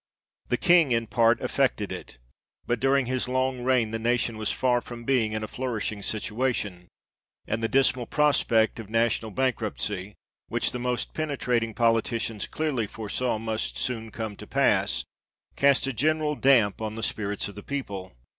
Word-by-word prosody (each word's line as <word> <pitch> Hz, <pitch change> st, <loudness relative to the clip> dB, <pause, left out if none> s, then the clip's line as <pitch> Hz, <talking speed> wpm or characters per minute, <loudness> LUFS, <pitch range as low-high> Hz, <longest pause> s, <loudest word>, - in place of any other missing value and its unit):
The -, -, +1 dB
King 170 Hz, -6 st, +5 dB
in 115 Hz, -1 st, +2 dB
part 115 Hz, +2 st, +3 dB
effected -, -, 0 dB
it; -, -, -8 dB, 0.5 s
but 120 Hz, -1 st, 0 dB
during 135 Hz, +1 st, +3 dB
his 130 Hz, 0 st, -1 dB
long 130 Hz, 0 st, 0 dB
reign, 125 Hz, -4 st, +2 dB
the 115 Hz, -, -2 dB
nation 120 Hz, -1 st, 0 dB
was 110 Hz, -, 0 dB
far 125 Hz, -1 st, +1 dB
from 120 Hz, -1 st, -9 dB
being 115 Hz, -4 st, +1 dB
in 110 Hz, 0 st, -2 dB
a -, -, -3 dB
flourishing 110 Hz, -4 st, -3 dB
situation, 105 Hz, -4 st, -2 dB, 0.6 s
and 115 Hz, +1 st, -2 dB
the 115 Hz, -, +1 dB
dismal 130 Hz, -1 st, +3 dB
prospect 120 Hz, -7 st, +2 dB
of 110 Hz, -3 st, -8 dB
national 115 Hz, 0 st, +1 dB
bank 130 Hz, +2 st, 0 dB
ruptcy, 105 Hz, -2 st, -3 dB, 0.3 s
which -, -, +1 dB
the 125 Hz, -, -4 dB
most 125 Hz, 0 st, -2 dB
penetrating 125 Hz, -7 st, -1 dB
politicians 115 Hz, -2 st, +1 dB
clearly 140 Hz, -9 st, -1 dB
foresaw 110 Hz, +3 st, -2 dB
must 110 Hz, 0 st, -2 dB
soon 115 Hz, -3 st, -2 dB
come 110 Hz, -1 st, -5 dB
to -, -, -10 dB
pass, -, -, +2 dB, 0.5 s
cast 140 Hz, -2 st, +4 dB
a 135 Hz, -, -2 dB
general 155 Hz, +5 st, +1 dB
damp 120 Hz, -8 st, +3 dB
on 110 Hz, -1 st, -3 dB
the 115 Hz, -, -5 dB
spirits 105 Hz, -2 st, 0 dB
of 100 Hz, -, -9 dB
the 105 Hz, -, -9 dB
people. 100 Hz, -9 st, -5 dB
115 Hz, 165 wpm, -26 LUFS, 110-130 Hz, 0.6 s, King